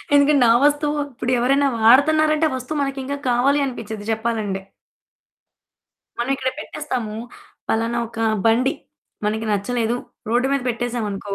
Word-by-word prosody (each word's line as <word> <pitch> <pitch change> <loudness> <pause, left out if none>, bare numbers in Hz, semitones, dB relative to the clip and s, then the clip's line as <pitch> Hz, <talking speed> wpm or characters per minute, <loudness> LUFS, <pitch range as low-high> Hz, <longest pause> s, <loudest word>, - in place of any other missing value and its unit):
ఎందుకంటే 285 -1 +5
నా 230 - +6
వస్తువు 295 +1 +2
ఇప్పుడెవరైనా 255 +3 +1
వాడుతున్నారంటే, 310 +6 +5
ఆ - - -3
వస్తువు 260 +4 -4
మనకింక 275 0 -3
కావాలి 275 +4 +3
అనిపిచ్చిద్ది 220 -4 -6
చెప్పాలంటే. 220 -4 -2 1.6
మనం 240 +3 -1
ఇక్కడ 260 -1 -1
పెట్టేస్తాము. 255 -9 -4 0.5
పలానా 230 +2 0
ఒక 230 -1 -11 0.3
బండి 250 +4 +3 0.5
మనకి 220 +1 -1
నచ్చలేదు, 230 +3 0 0.3
రోడ్డు 245 +3 +2
మీద 275 -2 0
పెట్టేసామనుకో. 225 -4 -3
245 Hz, 115 wpm, -21 LUFS, 225-280 Hz, 1.6 s, నా